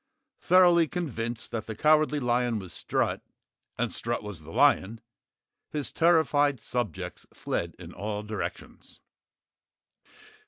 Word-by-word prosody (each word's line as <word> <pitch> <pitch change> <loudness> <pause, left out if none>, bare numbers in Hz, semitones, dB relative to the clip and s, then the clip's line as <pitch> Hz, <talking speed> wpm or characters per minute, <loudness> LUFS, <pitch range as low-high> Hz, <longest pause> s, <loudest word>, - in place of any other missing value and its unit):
Thoroughly 175 -2 +5
convinced 120 -9 -4
that 115 - -4
the 110 - -5
Cowardly 150 +3 +3
Lion 120 -2 +1
was 95 -5 -7
Strut - - -1 0.6
and - - -1
Strut - - -2
was 105 -6 -8
the 80 - -13
lion, 100 +6 +3 0.7
his 150 -2 -3
terrified 150 -5 +3
subjects 120 -5 -4
fled 85 0 -3
in 85 -1 -10
all 105 +2 -4
directions. 105 -1 -7
120 Hz, 115 wpm, -28 LUFS, 105-150 Hz, 0.7 s, Thoroughly